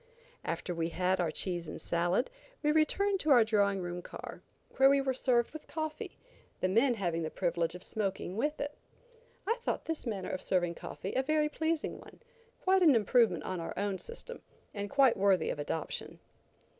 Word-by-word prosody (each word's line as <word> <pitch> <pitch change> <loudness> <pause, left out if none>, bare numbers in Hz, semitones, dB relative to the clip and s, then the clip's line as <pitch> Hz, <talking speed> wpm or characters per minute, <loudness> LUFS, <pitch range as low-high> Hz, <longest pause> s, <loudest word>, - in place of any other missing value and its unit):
After 180 - -3
we 165 0 -1
had 185 +2 +1
our 170 - +1
cheese 175 +1 -3
and - - -6
salad, 175 - 0 0.3
we 300 - +4
returned 385 +6 +2
to 310 - -1
our 245 -5 +8
drawing 200 -3 +2
room 175 0 -4
car, - - -9 0.4
where 265 +1 +7
we 280 0 +5
were 270 -1 0
served 245 -2 +2
with 310 - -9
coffee, 315 -1 -5 0.4
the - - +1
men 235 +6 +3
having 175 -5 -1
the 160 - -2
privilege 170 -1 -1
of 180 - -8
smoking 195 -3 -3
with 295 +7 -1
it. 290 +1 -3 0.7
I 455 +4 +1
thought - - -2
this 325 -5 -3
manner 200 -5 -3
of 185 - -3
serving 175 -2 +1
coffee 190 +3 -6
a 260 - +2
very 305 +2 +1
pleasing 320 +1 -1
one, - - -14 0.4
quite 380 0 +4
an 310 -7 +7
improvement 220 -4 +3
on 185 -1 -3
our 165 - -5
own 200 -1 -1
system, 480 +1 -7 0.3
and 205 -1 -4
quite 270 -2 +4
worthy 195 -1 +3
of - - -5
adoption. 150 +2 -4
215 Hz, 185 wpm, -32 LUFS, 180-295 Hz, 0.7 s, our